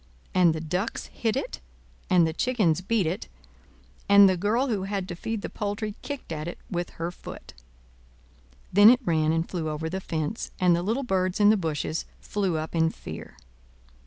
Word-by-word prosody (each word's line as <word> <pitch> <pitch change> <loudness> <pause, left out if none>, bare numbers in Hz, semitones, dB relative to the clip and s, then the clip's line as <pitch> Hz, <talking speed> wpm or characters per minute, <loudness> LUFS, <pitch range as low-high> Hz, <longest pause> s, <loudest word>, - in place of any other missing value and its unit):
And 175 -3 +4
the - - -3
ducks 180 +7 -2
hit 225 -2 -1
it, - - -3 0.5
and 180 -2 +5
the 160 - -1
chickens 195 -6 +1
beat 205 0 +1
it, 160 - -3 0.8
and 200 0 +9
the 185 - +3
girl 210 +8 +1
who 200 -5 -1
had 195 -2 -3
to 175 - -4
feed 220 +4 -4
the - - -2
poultry 205 +1 -3
kicked 285 - -6
at 155 0 -4
it 175 - -5
with 175 -1 -2
her 170 +1 -2
foot. - - -10 1.2
Then 205 +3 +9
it 245 +1 +6
ran 155 -3 +2
and 165 +1 0
flew 165 -4 -3
over 155 +1 -3
the 190 +1 -3
fence, 160 +4 -3
and 180 -2 +4
the 170 - 0
little 225 +9 -1
birds 185 -5 0
in 205 0 +7
the - - +4
bushes 160 -3 -2
flew 195 -5 -1
up 155 0 -4
in 160 -1 +3
fear. - - -9
185 Hz, 190 wpm, -26 LUFS, 165-205 Hz, 1.2 s, and